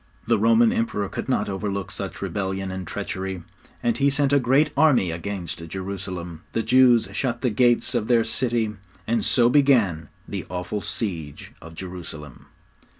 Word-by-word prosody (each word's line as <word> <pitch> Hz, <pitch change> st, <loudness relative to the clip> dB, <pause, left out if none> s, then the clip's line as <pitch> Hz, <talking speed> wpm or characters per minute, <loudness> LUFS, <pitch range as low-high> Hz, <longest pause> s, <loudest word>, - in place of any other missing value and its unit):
The -, -, +2 dB
Roman 230 Hz, 0 st, +4 dB
Emperor 230 Hz, -, -1 dB
could -, -, -5 dB
not -, -, +1 dB
overlook 100 Hz, 0 st, -3 dB
such 100 Hz, -, -5 dB
rebellion 95 Hz, -1 st, -3 dB
and 95 Hz, -2 st, -6 dB
treachery, 95 Hz, -1 st, -4 dB, 0.4 s
and 120 Hz, +1 st, +1 dB
he 140 Hz, 0 st, +4 dB
sent 140 Hz, 0 st, +2 dB
a 140 Hz, -, +6 dB
great 135 Hz, +4 st, +3 dB
army 135 Hz, -, +4 dB
against 85 Hz, -1 st, -5 dB
Jerusalem. 95 Hz, -3 st, -6 dB
The 115 Hz, -, 0 dB
Jews 125 Hz, -1 st, +5 dB
shut 120 Hz, +2 st, -2 dB
the 125 Hz, -, +1 dB
gates 120 Hz, +3 st, +3 dB
of 115 Hz, -3 st, -1 dB
their 120 Hz, -2 st, +4 dB
city, 115 Hz, -1 st, -1 dB, 0.3 s
and 115 Hz, 0 st, 0 dB
so 120 Hz, -2 st, +4 dB
began 120 Hz, -, +3 dB, 0.2 s
the -, -, -5 dB
awful 90 Hz, +4 st, -3 dB
siege 85 Hz, -, -4 dB
of 80 Hz, 0 st, -11 dB
Jerusalem. 85 Hz, -6 st, -9 dB
105 Hz, 155 wpm, -24 LUFS, 95-125 Hz, 0.4 s, a